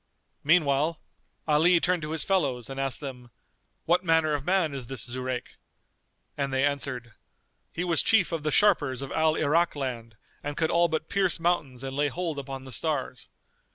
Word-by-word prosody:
Meanwhile 155 0 +3 0.5
Ali 165 +3 +5
turned 180 0 +1
to 150 - -5
his 160 0 -1
fellows 135 - 0
and 135 - -5
asked 135 +1 -2
them, 125 -4 -8 0.6
"What 175 +2 +3
manner 160 -3 +3
of 145 -2 -1
man 180 -3 +1
is 130 -4 -6
this 130 -5 -5
Zurayk?"; 125 +1 -5 0.8
and 140 -1 -2
they 130 +1 +2
answered, 130 -5 -3 0.6
"He 175 - -3
was 170 -2 +2
chief 210 -6 +3
of 165 -2 -2
the 155 - -1
sharpers 145 - +3
of 135 - -7
Al 160 0 +2
Irak 160 +3 +2
land 120 -5 -5 0.3
and 145 0 -4
could 160 -1 +1
all 170 0 +4
but 160 -1 -2
pierce 190 -3 0
mountains 150 -7 -1
and 135 0 -5
lay 145 +1 +2
hold 165 0 -3
upon 135 -1 -6
the 130 - -10
stars. 135 -1 -3
145 Hz, 180 wpm, -27 LUFS, 135-165 Hz, 0.8 s, Ali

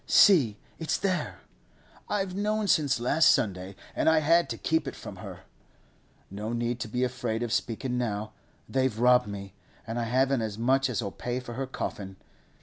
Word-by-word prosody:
'See, 140 - +6 0.2
it's 160 - 0
there. 185 -2 -2 0.7
I've 195 -3 -1
known 210 +2 0
since 145 -8 +3
last 140 +7 +4
Sunday, 95 -2 +1 0.2
and - - +3
I 160 - +4
had 165 +3 +3
to - - -3
keep 160 -3 0
it - - -5
from 95 - -9
her. 95 -3 -9 0.9
No 105 +3 -4
need 120 0 -1
to 120 - -3
be 125 +3 -1
afraid 120 -2 -2
of 120 -1 -2
speakin' 125 +2 -1
now. 110 -3 -2 0.4
They've 130 -4 0
robbed 125 -1 +4
me, 100 -1 -7 0.3
and 115 +1 -3
I 120 - -1
haven't 130 +2 +2
as 110 -2 -3
much 130 +3 +2
as'll 110 -4 -2
pay 125 +5 -3
for 120 -2 -8
her 135 +2 -3
coffin. 95 -6 -5
125 Hz, 175 wpm, -28 LUFS, 110-140 Hz, 0.9 s, See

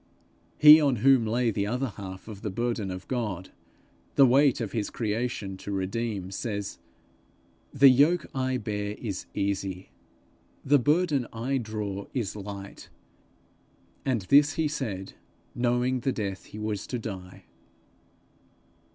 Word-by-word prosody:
He 150 +1 +9
on 140 -4 +3
whom 130 -5 +5
lay 120 +1 +1
the 100 -1 -1
other 125 +4 -1
half 95 -2 -9
of 105 -3 -9
the 110 - -3
burden 115 -1 -2
of 90 0 -7
God, 105 -8 -3 0.6
the 140 - +7
weight 135 +1 +4
of 110 -5 -3
his 110 -3 -2
creation 110 -3 -3
to 100 - -7
redeem, 100 0 -3
says, 100 0 -4 0.9
'The 140 0 +6
yoke 150 +6 +4
I 130 -1 0
bear 105 -2 -3
is 100 -6 -5
easy; 95 -2 -2 0.7
the 145 +1 +5
burden 150 -2 +2
I 130 +4 -1
draw 105 -3 -4
is 115 -7 -2
light'; 100 -1 -8 1.1
and 125 -5 0
this 145 +7 +5
he 160 -1 0
said, 105 -10 -4 0.4
knowing 125 +1 +1
the 130 +2 0
death 100 -5 -4
he - - -11
was 105 -2 -3
to 125 - -3
die. 95 -5 -8
115 Hz, 135 wpm, -27 LUFS, 100-130 Hz, 1.1 s, He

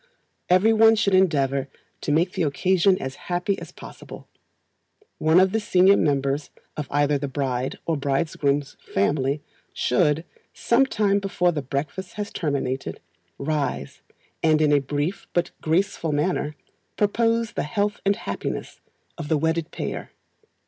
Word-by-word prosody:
Everyone 220 +4 +5
should 205 -3 +1
endeavour 140 -7 +2 0.3
to - - -2
make 170 +5 +2
the - - -3
occasion 185 +5 +2
as 135 0 -4 0.2
happy 180 +3 0
as - - -9
possible. - - -11 0.9
One 160 +3 +5
of 190 0 +4
the 220 - +1
senior 190 -2 +5
members 140 -1 0 0.3
of 150 -2 -4
either 145 0 +2
the 140 - -3
bride 130 -2 -2
or 165 - 0
bridegroom's 140 0 -1 0.2
family 140 +7 +1 0.3
should, 150 +5 +1 0.3
sometime 220 -5 +2
before 190 -3 +1
the 155 -3 -3
breakfast 140 +8 -4
has 205 -1 -5
terminated, 135 - -2 0.4
rise, 140 - -3 0.4
and 155 -1 +4
in 155 -1 +3
a 145 - +5
brief 145 +7 -3
but 175 -1 0
graceful 165 0 0
manner, 150 0 0 0.4
propose 230 +2 +1
the - - -2
"Health 205 +7 -1
and 200 +1 +2
happiness - - -5 0.4
of 160 - -4
the 155 - +2
wedded 160 +1 0
pair." - - -5
155 Hz, 135 wpm, -24 LUFS, 140-190 Hz, 0.9 s, Everyone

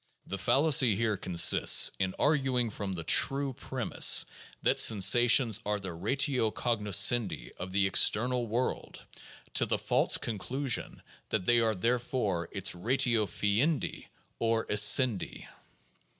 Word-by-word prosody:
The 95 - -7
fallacy 135 - +2
here 110 0 -2
consists 90 -3 +4
in 95 0 -3
arguing 135 -6 0
from 100 -2 -6
the 85 -2 -5
true 135 - 0
premise - - +1 0.4
that - - 0
sen 110 - +5
sations 115 +2 +3
are 105 0 -3
the 95 -3 -8
ratio 125 - -1
cognoscendi 105 -1 0
of 90 +1 -8
the 100 +1 0
external 120 +5 +1
world, 120 +4 -5 0.5
to - - 0
the - - -1
false - - 0
conclusion 120 +4 -4 0.3
that 105 -4 -3
they 120 0 +2
are 110 -2 0
therefore 110 -5 -3
its 100 -2 -4
ratio 115 +3 0
fiendi 105 - -2 0.3
or 115 -1 -1
essendi. 105 +1 +2
115 Hz, 125 wpm, -28 LUFS, 100-125 Hz, 0.5 s, sen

